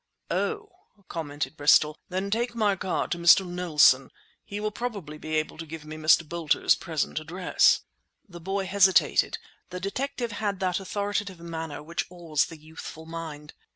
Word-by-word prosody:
"Oh," 430 Hz, -1 st, -1 dB, 0.4 s
commented 155 Hz, -1 st, -4 dB
Bristol, 150 Hz, 0 st, +5 dB
"then 190 Hz, +2 st, -2 dB
take 235 Hz, +2 st, 0 dB
my 210 Hz, -3 st, +2 dB
card 185 Hz, 0 st, -2 dB
to 175 Hz, -, -1 dB
Mr. 170 Hz, +3 st, +7 dB
Knowlson; 155 Hz, -7 st, +4 dB, 0.3 s
he 205 Hz, -, -6 dB
will 215 Hz, 0 st, -2 dB
probably 200 Hz, -11 st, -5 dB
be 155 Hz, +1 st, -4 dB
able 155 Hz, 0 st, -2 dB
to 165 Hz, -, -5 dB
give 155 Hz, 0 st, -8 dB
me 155 Hz, 0 st, -7 dB
Mr. 155 Hz, +1 st, +4 dB
Boulter's 165 Hz, -1 st, +2 dB
present 160 Hz, -3 st, -2 dB
address." 175 Hz, +4 st, +3 dB, 0.5 s
The 175 Hz, -3 st, -11 dB
boy 195 Hz, +2 st, -2 dB
hesitated. 190 Hz, 0 st, +4 dB, 0.3 s
The 180 Hz, 0 st, -5 dB
detective 245 Hz, +5 st, -3 dB
had 205 Hz, -2 st, -2 dB
that 185 Hz, -1 st, 0 dB
authoritative 200 Hz, -1 st, -3 dB
manner 165 Hz, -3 st, -6 dB
which 170 Hz, +3 st, -3 dB
awes 170 Hz, -4 st, 0 dB
the 165 Hz, -, -10 dB
youthful 160 Hz, +1 st, -10 dB
mind. 160 Hz, -3 st, -7 dB
170 Hz, 155 wpm, -27 LUFS, 155-200 Hz, 0.5 s, Mr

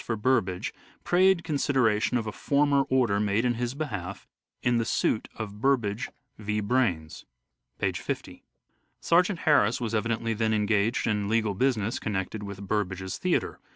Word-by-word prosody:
for 115 Hz, -, -2 dB
Burbage 105 Hz, -6 st, 0 dB, 0.3 s
prayed 185 Hz, 0 st, +3 dB
consideration 125 Hz, -7 st, +1 dB
of 115 Hz, -, -2 dB
a 110 Hz, -, -3 dB
former 140 Hz, +3 st, +2 dB
order 120 Hz, -6 st, +2 dB
made 105 Hz, +3 st, +1 dB
in 120 Hz, -, +2 dB
his 120 Hz, +2 st, -3 dB
behalf 100 Hz, -, -5 dB, 0.4 s
in 120 Hz, -1 st, +2 dB
the -, -, +1 dB
suit 110 Hz, -1 st, 0 dB
of 105 Hz, -2 st, -7 dB
Burbage 120 Hz, -4 st, +1 dB, 0.3 s
v. 105 Hz, 0 st, -2 dB
Braynes 100 Hz, -9 st, -1 dB, 0.3 s
" -, -, -50 dB
(p. -, -, +1 dB
50). -, -, -5 dB, 0.6 s
Sergeant 180 Hz, +2 st, +2 dB
Harris 140 Hz, -8 st, +3 dB
was 115 Hz, -2 st, -3 dB
evidently 115 Hz, +1 st, 0 dB
then 110 Hz, 0 st, +1 dB
engaged 105 Hz, +1 st, +1 dB
in 105 Hz, -2 st, 0 dB
legal 110 Hz, -2 st, +1 dB
business 115 Hz, -1 st, 0 dB
connected 100 Hz, 0 st, -3 dB
with 100 Hz, -1 st, -7 dB
Burbage's 95 Hz, -2 st, -2 dB
theatre. -, -, 0 dB
110 Hz, 155 wpm, -27 LUFS, 100-130 Hz, 0.6 s, prayed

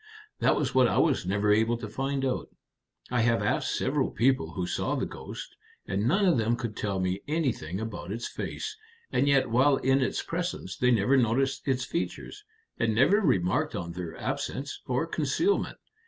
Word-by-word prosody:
"That -, -, +3 dB
was -, -, -1 dB
what 130 Hz, -1 st, +5 dB
I -, -, 0 dB
was -, -, +2 dB
never 100 Hz, +2 st, +2 dB
able 110 Hz, +2 st, +2 dB
to 115 Hz, -2 st, -6 dB
find 135 Hz, +4 st, -2 dB
out. 130 Hz, -, -2 dB, 0.6 s
I 120 Hz, -2 st, +2 dB
have 115 Hz, 0 st, +2 dB
asked -, -, 0 dB
several -, -, 0 dB
people 115 Hz, -9 st, +1 dB
who 90 Hz, 0 st, -2 dB
saw -, -, -1 dB
the -, -, -1 dB
ghost, -, -, -8 dB, 0.3 s
and 100 Hz, +3 st, -1 dB
none 195 Hz, +9 st, +3 dB
of 170 Hz, -10 st, +4 dB
them 115 Hz, +2 st, +2 dB
could 115 Hz, -3 st, -5 dB
tell 100 Hz, -2 st, -2 dB
me 95 Hz, +1 st, -1 dB
anything 125 Hz, -, -1 dB
about 110 Hz, -5 st, -5 dB
its 115 Hz, +3 st, -3 dB
face, 435 Hz, -1 st, -5 dB, 0.4 s
and 140 Hz, -, +2 dB
yet 135 Hz, -4 st, +3 dB
while 135 Hz, +4 st, +4 dB
in 135 Hz, +1 st, +2 dB
its 130 Hz, -, -1 dB
presence 165 Hz, -, -3 dB
they 125 Hz, -, +2 dB
never 120 Hz, +3 st, +4 dB
noticed 130 Hz, +4 st, +1 dB
its 130 Hz, -2 st, +1 dB
features, 175 Hz, -, -4 dB, 0.4 s
and 115 Hz, -2 st, +1 dB
never 155 Hz, -, +5 dB
remarked 95 Hz, -, +1 dB
on 85 Hz, 0 st, -4 dB
their 85 Hz, -1 st, -6 dB
absence 140 Hz, +1 st, -4 dB
or 125 Hz, +4 st, 0 dB
concealment. 165 Hz, -, 0 dB
125 Hz, 185 wpm, -28 LUFS, 105-135 Hz, 0.6 s, what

